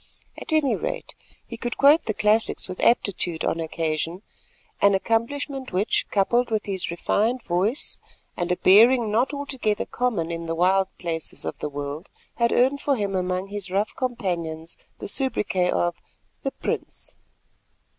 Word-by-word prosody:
At - - -8
any 300 -6 +3
rate - - -4 0.3
he 230 - -8
could 240 +1 -4
quote 290 +4 +6
the 215 - -2
classics 215 +2 +2
with 185 -1 -7
aptitude 180 -7 +1
on 165 - 0
occasion, 165 +2 -2 0.6
an 200 -1 +5
accomplishment 260 +6 -1
which, 190 +4 +1
coupled 235 +5 +2
with 220 -2 -1
his 190 -3 -2
refined 220 +8 0
voice 190 +10 0 0.4
and 175 0 -2
a 180 - +1
bearing 225 +3 +6
not 235 +6 +2
altogether 265 -7 -2
common 220 -10 -1
in 165 0 -4
the 165 - -2
wild 190 +3 +3
places 165 -3 -4
of - - -4
the 150 - -3
world, 145 +4 -6 0.3
had 235 -1 +2
earned 265 +3 +3
for 280 - +2
him 200 -4 -2
among 185 +1 -1
his 200 -2 -5
rough 200 +3 -1
companions 170 -10 -3 0.2
the - - -6
soubriquet 200 -7 +2
of 175 -1 0 0.4
"The 270 - -1
Prince." - - -4
205 Hz, 155 wpm, -24 LUFS, 175-245 Hz, 0.6 s, quote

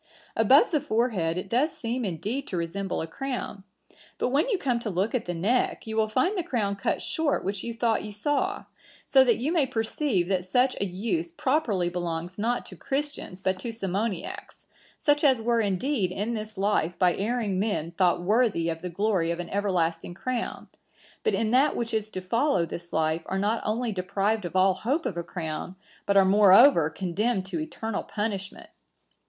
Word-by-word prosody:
Above 465 - +5
the 305 -4 +2
forehead 215 -9 0
it 185 - -4
does 255 +10 +1
seem 245 -2 -2
indeed 210 - -3
to 185 - -3
resemble 180 +3 -2
a - - -2
crown; 245 0 -5 0.5
but - - 0
when 285 - +2
you 425 - +2
come 250 -7 0
to 235 - -4
look 190 +3 -1
at 250 - -1
the 175 - -3
neck, 215 +10 0
you 220 -1 -5
will 220 -1 +2
find 260 - +1
the 370 - 0
crown 220 - -1
cut 200 - -1
short 320 -3 0
which 195 0 -3
you 235 - -3
thought 230 -1 0
you 210 - -6
saw; 290 - -1 0.4
so 265 -1 +6
that 240 -3 +3
you 270 +7 -1
may 320 -6 +2
perceive 225 - 0
that 185 -1 0
such 250 +8 +2
a - - +2
use 225 - -2
properly 275 - 0
belongs 175 +1 -4
not 235 +3 0
to - - -10
Christians 275 -9 -4
but 190 -1 0
to 230 +4 -4
Simoniacs, 200 -2 -4 0.3
such 290 -1 +2
as 265 -5 +5
were 230 +1 +1
indeed 200 +1 0
in 210 +5 -2
this 215 -2 -6
life 190 -4 +1
by 180 -2 +4
erring 210 -2 -1
men 195 -6 -1
thought 175 -1 +2
worthy 210 -4 +2
of 165 0 -4
the 180 - -4
glory 190 -2 0
of 170 0 -2
an 175 - -5
everlasting 175 -4 -1
crown; 235 +5 -3 0.6
but 440 - +2
in 225 -1 0
that 270 +4 +4
which 230 -1 -3
is 215 -1 -1
to 185 - -5
follow 230 - +1
this 170 +1 -8
life 160 +1 +1
are 190 - -2
not 210 +4 0
only 230 +2 -1
deprived 195 +2 -1
of 175 - -6
all 190 0 +5
hope 270 - -1
of 185 - -2
a 170 - -2
crown, 165 +1 -5 0.3
but 200 - +3
are 195 - +7
moreover 195 - +6
condemned 190 +5 -1
to 190 - -4
eternal 270 -9 -3
punishment. 205 -3 -4
210 Hz, 195 wpm, -27 LUFS, 185-245 Hz, 0.6 s, are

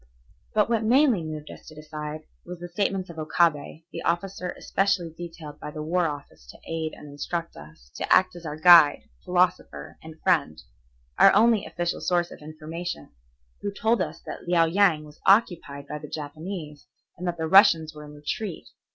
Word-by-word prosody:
But - - +4
what 230 -1 0
mainly 245 - +4
moved 155 -1 -7
us - - -13
to 155 - -12
decide, 150 0 -7 0.2
was 180 +1 -8
the 175 +1 -8
statements 190 0 -1
of 160 - -10
Okabe, 155 0 0
the - - -6
officer 180 +1 -2
especially 195 -4 0
detailed 165 -4 -9
by - - -7
the 150 0 -6
War 175 +2 +1
Office 140 - -8
to - - -13
aid 160 -1 -3
and 150 - -12
instruct 165 +4 -5
us, 75 -4 -15
to - - -4
act 185 -1 +4
as 175 - -10
our 150 -2 -5
guide, 155 -3 +7 0.2
philosopher, 180 - -1
and 160 0 -12
friend, 155 - +2 0.6
our - - +8
only 220 -1 +4
official 175 0 -3
source 175 -1 0
of - - -11
information, 155 - -7 0.5
who 205 - -3
told 225 +3 +1
us 160 +2 -4
that - - -8
Liao 170 -1 +4
Yang 170 -2 +3
was 150 0 -15
occupied 175 -9 +2
by 150 - -5
the 150 -1 -10
Japanese 155 0 -7 0.3
and 180 +1 -6
that 175 -1 -2
the 160 - -2
Russians 165 -3 +6
were 150 0 -10
in 150 0 -12
retreat. 150 - -5
165 Hz, 180 wpm, -25 LUFS, 150-180 Hz, 0.6 s, our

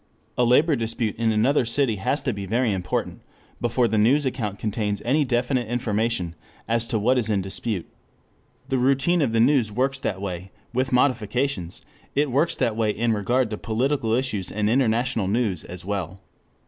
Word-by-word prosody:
A 125 - +2
labor 145 +6 +4
dispute 115 -1 -2
in 115 0 +1
another 120 +7 +3
city 115 -1 0
has 135 +10 -1
to 130 - 0
be 100 -1 -6
very 115 +1 +1
important 90 -2 -3 0.4
before 120 +1 +2
the 110 -1 +1
news 135 +7 +4
account 115 -6 -2
contains 105 -1 -2
any 145 +5 +3
definite 125 -1 0
information 115 -6 -1 0.3
as 115 +1 +1
to 115 - 0
what 125 +5 +2
is 110 -2 -2
in 100 -3 +1
dispute. 95 0 -3 0.8
The 130 - 0
routine 140 +7 +2
of 135 -6 +1
the 115 - +1
news 120 -3 +3
works 130 +4 0
that 100 -8 -2
way, 95 -1 -5 0.2
with 130 +2 0
modifications 125 -6 0 0.3
it 145 -1 +1
works 145 +7 +2
that 120 -4 0
way 110 -1 +1
in 115 +2 +1
regard 115 +3 0
to 105 - -4
political 115 +1 0
issues 120 -7 -1
and 105 +1 0
international 120 -3 +1
news 105 -4 0
as 90 0 -7
well. 95 -2 -3
115 Hz, 175 wpm, -24 LUFS, 105-130 Hz, 0.8 s, labor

